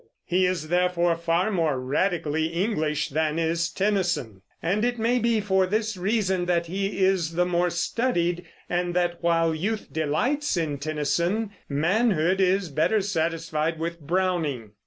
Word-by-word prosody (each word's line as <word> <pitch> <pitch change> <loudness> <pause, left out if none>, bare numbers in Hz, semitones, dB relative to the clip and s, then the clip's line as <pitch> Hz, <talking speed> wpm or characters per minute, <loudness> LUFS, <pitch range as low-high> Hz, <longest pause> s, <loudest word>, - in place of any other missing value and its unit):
He 180 +1 +2
is, 170 -4 -2
therefore, 175 -1 +2
far 170 +4 0
more 160 -8 +1
radically 155 +3 0
English 165 -4 -1
than 155 +1 0
is 165 +1 0
Tennyson; 175 - -1 0.2
and 200 +6 0
it 245 0 0
may 235 +2 +2
be 230 -1 +2
for 190 -2 +2
this 215 +2 -1
reason 190 -1 0
that 170 -1 +1
he 195 +2 -2
is 185 -4 +2
the 180 +1 +2
more 180 0 +1
studied, 175 -1 0 0.2
and 175 0 -1
that, 175 -1 0
while 165 -1 +2
youth 205 +7 -3
delights 185 - 0
in 150 -4 -1
Tennyson, 170 +8 -1 0.2
manhood 185 +3 +2
is 190 -1 +2
better 155 +9 +2
satisfied 165 -3 -1
with 170 +1 -4
Browning. 160 - -1
175 Hz, 145 wpm, -25 LUFS, 160-195 Hz, 0.2 s, He